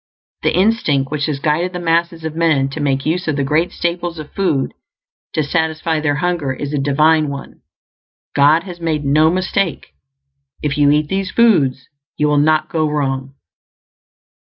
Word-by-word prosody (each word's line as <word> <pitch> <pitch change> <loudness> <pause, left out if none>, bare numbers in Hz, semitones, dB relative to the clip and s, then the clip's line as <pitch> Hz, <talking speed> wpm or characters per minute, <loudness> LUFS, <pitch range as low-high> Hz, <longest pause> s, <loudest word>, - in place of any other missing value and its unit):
The - - +1
instinct 180 - +1
which 150 -2 -1
has 150 -3 -2
guided 155 +6 0
the 180 - -4
masses 170 -1 0
of 160 -1 -4
men 155 -5 +2
to 135 - -7
make 135 -2 0
use 175 +3 -1
of 155 - 0
the 140 - 0
great 155 +5 +1
staples 175 0 -3
of 155 -1 -9
food 165 -9 0 0.6
to 155 - +1
satisfy 160 +1 -1
their 145 -2 0
hunger 155 -4 -1
is 145 +2 -5
a 145 - 0
divine 150 +2 +3
one. 140 -1 -8 0.7
God 150 +4 +4
has 175 -3 -10
made 155 -3 -1
no 155 +3 +4
mistake; 185 -1 -1 0.7
if 145 -2 0
you 145 -1 +4
eat 150 +1 +2
these 195 +2 -2
foods 150 - +2 0.3
you 150 - +2
will 150 -1 +3
not 155 +1 +2
go 155 -2 0
wrong. 135 -2 -2
155 Hz, 170 wpm, -18 LUFS, 145-170 Hz, 0.7 s, God